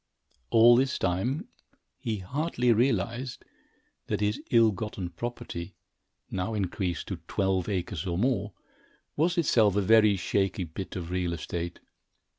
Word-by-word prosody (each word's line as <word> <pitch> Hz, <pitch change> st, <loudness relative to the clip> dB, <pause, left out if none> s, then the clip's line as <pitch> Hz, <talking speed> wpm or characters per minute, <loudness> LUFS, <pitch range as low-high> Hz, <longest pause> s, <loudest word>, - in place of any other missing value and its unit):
All 115 Hz, +1 st, +7 dB
this 130 Hz, +1 st, +1 dB
time, 120 Hz, -, -1 dB, 0.5 s
he 115 Hz, -5 st, -2 dB
hardly 125 Hz, -, 0 dB
realized 120 Hz, +1 st, 0 dB, 0.6 s
that -, -, -1 dB
his 105 Hz, +1 st, 0 dB
ill 115 Hz, -2 st, +5 dB
gotten 100 Hz, -3 st, -5 dB
property, 95 Hz, -4 st, -6 dB, 0.6 s
now 95 Hz, +4 st, -2 dB
increased 95 Hz, -3 st, -2 dB
to 95 Hz, -, -3 dB
twelve 95 Hz, -1 st, 0 dB
acres 90 Hz, -3 st, -3 dB
or 85 Hz, -1 st, -1 dB
more, 105 Hz, -2 st, 0 dB, 0.6 s
was 170 Hz, +4 st, +1 dB
itself 110 Hz, -, +4 dB
a 105 Hz, -, +3 dB
very 110 Hz, 0 st, +5 dB
shaky 95 Hz, 0 st, 0 dB
bit 85 Hz, +3 st, -7 dB
of 90 Hz, -2 st, -5 dB
real 90 Hz, -2 st, -1 dB
estate. 85 Hz, +1 st, -5 dB
105 Hz, 130 wpm, -28 LUFS, 90-120 Hz, 0.6 s, All